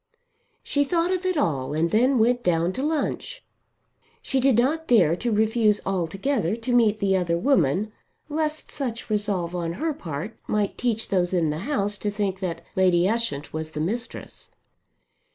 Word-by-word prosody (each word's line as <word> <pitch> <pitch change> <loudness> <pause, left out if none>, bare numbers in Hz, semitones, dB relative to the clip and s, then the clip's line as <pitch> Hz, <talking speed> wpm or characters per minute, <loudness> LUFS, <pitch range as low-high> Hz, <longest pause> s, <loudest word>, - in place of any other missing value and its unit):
She 285 - +1
thought 335 +4 +1
of 370 0 -1
it 370 -3 0
all 145 - 0
and 165 +2 +1
then 250 +5 +3
went 240 +2 +3
down 170 0 +1
to 260 - -3
lunch. 310 - -2 0.8
She 270 - 0
did 260 -3 +3
not 310 +7 +1
dare 180 -10 +5
to 240 +3 -2
refuse 215 0 +2
altogether 195 - -1
to 235 +2 -2
meet 225 -3 +4
the 200 -2 +1
other 170 -2 +1
woman 195 - +2 0.4
lest 310 0 -2
such 245 -5 -4
resolve 200 -5 -1
on 170 -1 -2
her 315 - -2
part 170 - -6
might 210 -1 0
teach 230 -3 -1
those 180 -1 +1
in 165 -4 +2
the 150 - -3
house 205 -7 -1
to 210 - -1
think 200 -2 -2
that 170 -3 -4
Lady 180 -1 +4
Ushant 210 -10 -2
was 155 0 -4
the 150 - -4
mistress. 230 +10 -5
210 Hz, 170 wpm, -24 LUFS, 175-250 Hz, 0.8 s, dare